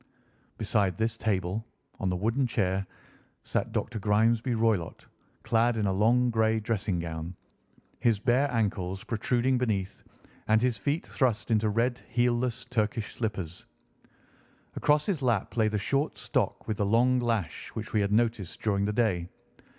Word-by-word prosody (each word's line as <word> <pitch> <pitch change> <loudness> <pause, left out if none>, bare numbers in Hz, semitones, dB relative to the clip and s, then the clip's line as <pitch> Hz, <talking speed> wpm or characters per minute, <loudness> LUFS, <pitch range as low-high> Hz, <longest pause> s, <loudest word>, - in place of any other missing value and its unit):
Beside 100 -4 +1
this 110 +1 0
table, 100 -1 -1 0.4
on 95 - 0
the 90 - 0
wooden 115 +8 +1
chair, 95 -3 0 0.6
sat - - -2
Dr. 110 - -2
Grimesby 110 +4 +2
Roylott 110 -7 0 0.4
clad 115 +1 +2
in 105 - 0
a 95 - +1
long 120 +5 +3
grey 110 0 +2
dressing 105 -4 -1
gown, 85 +1 -5 0.6
his 115 -5 +2
bare 130 +5 +2
ankles 95 -5 -1
protruding 125 +3 +1
beneath, 100 -6 -2 0.5
and 110 0 +4
his 125 0 +1
feet 150 +3 -1
thrust 120 -5 0
into 110 -1 +3
red 120 +4 0
heelless 120 0 0
Turkish 110 -3 -1
slippers. 95 -7 -4 1.1
Across 150 0 +2
his 185 -8 -1
lap 120 -6 0
lay 110 -2 +3
the 110 0 0
short 140 +9 -1
stock - - -1
with 110 - -2
the 105 - +1
long 125 +4 +3
lash 115 -7 -2
which 110 +2 -5
we 105 - +3
had 100 0 0
noticed 110 -4 0
during 100 -2 +1
the 105 - -1
day. 95 -7 +1
110 Hz, 150 wpm, -28 LUFS, 100-120 Hz, 1.1 s, and